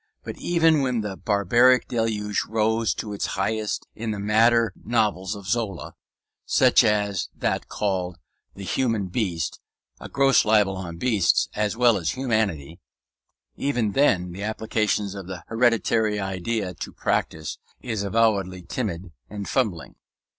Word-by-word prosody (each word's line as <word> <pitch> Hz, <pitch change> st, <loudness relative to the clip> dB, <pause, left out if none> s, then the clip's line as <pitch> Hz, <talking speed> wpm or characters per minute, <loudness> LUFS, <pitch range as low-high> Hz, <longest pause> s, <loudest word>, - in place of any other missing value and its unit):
But -, -, -6 dB
even 165 Hz, -3 st, +3 dB
when 125 Hz, -4 st, 0 dB
the 105 Hz, -2 st, -4 dB
barbarian 120 Hz, +6 st, +3 dB
deluge 110 Hz, -3 st, -1 dB
rose 110 Hz, +1 st, +1 dB
to 105 Hz, -2 st, -5 dB
its 100 Hz, -, -2 dB
highest 105 Hz, +2 st, -1 dB
in 115 Hz, +1 st, -5 dB
the 105 Hz, -, -2 dB
madder 110 Hz, +1 st, +3 dB
novels 105 Hz, -4 st, 0 dB
of 100 Hz, -1 st, -10 dB
Zola 100 Hz, -3 st, -2 dB, 0.5 s
(such -, -, +4 dB
as 105 Hz, -4 st, 0 dB
that -, -, -2 dB
called 90 Hz, -4 st, -2 dB, 0.4 s
"The 100 Hz, -, -8 dB
Human 110 Hz, -3 st, -1 dB
Beast", 90 Hz, -6 st, -2 dB, 0.4 s
a -, -, -9 dB
gross 135 Hz, -3 st, +4 dB
libel 105 Hz, -3 st, +3 dB
on 85 Hz, -3 st, -6 dB
beasts 105 Hz, -3 st, +2 dB
as 105 Hz, 0 st, -1 dB
well 120 Hz, -3 st, +4 dB
as 85 Hz, +5 st, -2 dB
humanity), 100 Hz, -, -1 dB, 0.8 s
even 120 Hz, -7 st, 0 dB
then 95 Hz, -9 st, +2 dB
the 95 Hz, +3 st, -8 dB
application 105 Hz, -1 st, -1 dB
of 95 Hz, -2 st, -8 dB
the 90 Hz, -2 st, -7 dB
hereditary 115 Hz, -2 st, +2 dB
idea 95 Hz, +1 st, -2 dB
to -, -, -7 dB
practice 80 Hz, -1 st, -2 dB, 0.2 s
is 110 Hz, -5 st, -3 dB
avowedly 100 Hz, -3 st, +1 dB
timid 95 Hz, -5 st, -4 dB, 0.2 s
and 100 Hz, -1 st, -6 dB
fumbling. 100 Hz, -, -1 dB
105 Hz, 140 wpm, -24 LUFS, 95-115 Hz, 0.8 s, such